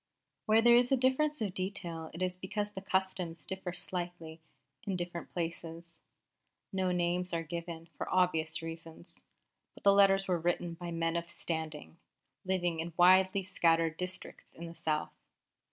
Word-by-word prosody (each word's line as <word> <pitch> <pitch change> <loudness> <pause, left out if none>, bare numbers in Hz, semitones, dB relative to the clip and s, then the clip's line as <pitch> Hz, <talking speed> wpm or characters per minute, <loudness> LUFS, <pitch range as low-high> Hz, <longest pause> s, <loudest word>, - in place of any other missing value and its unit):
Where 220 +1 +5
there 240 0 +7
is 245 +1 +5
a 270 - +5
difference 265 +4 +2
of 200 -4 -1
detail 180 -4 -4
it 170 +3 -4
is 180 0 -1
because 205 +3 -3
the 190 - -7
customs 190 -4 -1
differ 190 -1 -4
slightly 175 -2 -5 0.4
in 195 - -2
different 175 -1 -5
places. 170 0 -5 0.7
No 190 -1 +1
names 180 0 0
are 165 0 0
given, 165 0 -6
for - - -5
obvious 165 -3 +2
reasons; 165 +1 -9 0.5
but - - -16
the 200 - +7
letters 195 -1 +5
were 180 -2 +1
written 175 0 0
by 175 +1 -7
men 165 0 -1
of 170 0 -2
standing, 160 -2 -4 0.5
living 175 -3 0
in 165 +1 -4
widely 185 +2 +6
scattered 165 -3 +2
districts 180 +2 -6
in 170 - -7
the 165 - -8
South. 155 -2 -1
175 Hz, 155 wpm, -32 LUFS, 165-190 Hz, 0.7 s, there